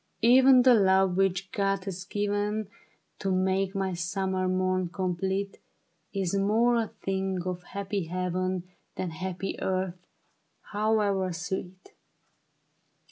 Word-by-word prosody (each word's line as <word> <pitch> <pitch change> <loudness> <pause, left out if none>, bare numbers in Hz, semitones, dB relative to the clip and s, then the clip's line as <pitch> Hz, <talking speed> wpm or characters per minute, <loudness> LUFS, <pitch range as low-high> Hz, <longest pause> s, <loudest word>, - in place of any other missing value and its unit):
" - - -44
Even 255 +2 +7
the 255 -1 +7
love 190 -3 +4
which 195 0 0
God 195 -1 0
has 190 -1 -5
given 205 +1 -1 0.5
To 195 - -1
make 190 +1 +1
my 190 -1 -1
summer 185 +2 -1
morn 185 -1 0
complete, 190 +2 -2 0.5
Is 195 -3 -2
more 220 +5 +3
a 225 -1 0
thing 190 -2 -3
of 180 -1 -3
happy 200 0 -4
heaven 185 +1 -2 0.3
Than 180 -2 -3
happy 185 +3 -4
earth, 185 -1 -1 0.7
however 205 -3 +1
sweet. 180 +2 -6
190 Hz, 120 wpm, -28 LUFS, 185-200 Hz, 0.7 s, Even